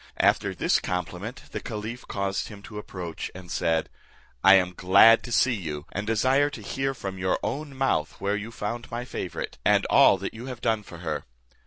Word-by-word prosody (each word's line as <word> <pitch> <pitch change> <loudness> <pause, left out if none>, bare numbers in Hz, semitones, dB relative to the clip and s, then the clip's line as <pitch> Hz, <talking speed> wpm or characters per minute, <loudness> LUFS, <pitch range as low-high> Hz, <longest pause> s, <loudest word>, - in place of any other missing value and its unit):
After - - +3
his - - +2
compliment, 90 +6 -4
the - - -3
caliph 110 +2 -6
caused 100 0 -2
him 100 -2 -11
to 105 0 -7
approach, 90 -5 -6
and 90 -1 -10
said, 80 -1 +1 0.6
"I 95 +1 +9
am 90 -1 +2
glad 100 +6 +7
to 120 - -7
see 125 +2 +3
you, 80 -8 -5
and 105 +1 -4
desire 130 +6 +3
to 135 -6 -9
hear 135 +5 -2
from 95 -5 -6
your 95 0 +1
own 145 -1 -4
mouth 130 - 0
where 100 +2 0
you 105 +2 -5
found 115 +3 -5
my 120 +1 -4
favourite, 90 -8 -5
and - - +4
all - - +7
that 95 - -5
you 115 +3 -8
have 125 -3 -6
done 110 -2 +1
for 90 -4 -11
her." 80 - -2
105 Hz, 195 wpm, -26 LUFS, 95-120 Hz, 0.6 s, I